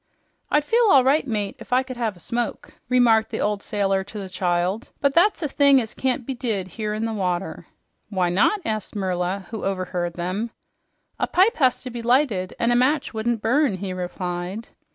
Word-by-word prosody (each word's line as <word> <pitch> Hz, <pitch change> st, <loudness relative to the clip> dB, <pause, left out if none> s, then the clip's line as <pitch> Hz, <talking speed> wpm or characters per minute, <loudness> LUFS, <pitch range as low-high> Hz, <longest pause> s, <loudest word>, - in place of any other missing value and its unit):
"I'd 295 Hz, -, +3 dB
feel 465 Hz, +9 st, +3 dB
all 270 Hz, -7 st, +7 dB
right, 275 Hz, +2 st, +2 dB
mate, 210 Hz, -4 st, -2 dB
if -, -, -12 dB
I 255 Hz, +1 st, +3 dB
could 260 Hz, -1 st, -7 dB
have 225 Hz, -6 st, -2 dB
a -, -, -16 dB
smoke," 235 Hz, +6 st, -3 dB, 0.2 s
remarked 235 Hz, -3 st, +4 dB
the -, -, -4 dB
old 210 Hz, -1 st, 0 dB
sailor 195 Hz, -3 st, 0 dB
to 215 Hz, -, -9 dB
the 195 Hz, -2 st, -6 dB
child, 180 Hz, +4 st, -1 dB
"but 280 Hz, -1 st, +2 dB
that's 355 Hz, +3 st, +3 dB
a -, -, +1 dB
thing 280 Hz, -1 st, +5 dB
as 225 Hz, -3 st, -4 dB
can't 255 Hz, -2 st, -1 dB
be 270 Hz, -, -3 dB
did 220 Hz, -7 st, -3 dB
here 210 Hz, +3 st, -3 dB
in 220 Hz, +1 st, -2 dB
the 225 Hz, -, -2 dB
water." 185 Hz, -3 st, -3 dB, 0.4 s
"Why 185 Hz, -4 st, +1 dB
not?" 300 Hz, -, +2 dB
asked 215 Hz, -1 st, -3 dB
Merla, 185 Hz, 0 st, -2 dB
who 220 Hz, -, -5 dB
overheard 180 Hz, -3 st, -2 dB
him. 185 Hz, +6 st, -3 dB, 0.7 s
"A -, -, +1 dB
pipe 395 Hz, +6 st, +3 dB
has 260 Hz, -5 st, +2 dB
to 255 Hz, -, -6 dB
be 235 Hz, 0 st, -5 dB
lighted, 235 Hz, -6 st, +1 dB
an' 235 Hz, -, +1 dB
a -, -, +3 dB
match 265 Hz, +4 st, +2 dB
wouldn't 225 Hz, 0 st, -1 dB
burn," 260 Hz, -1 st, +2 dB
he 185 Hz, 0 st, -4 dB
replied. 180 Hz, +3 st, -4 dB
220 Hz, 200 wpm, -23 LUFS, 190-255 Hz, 0.7 s, all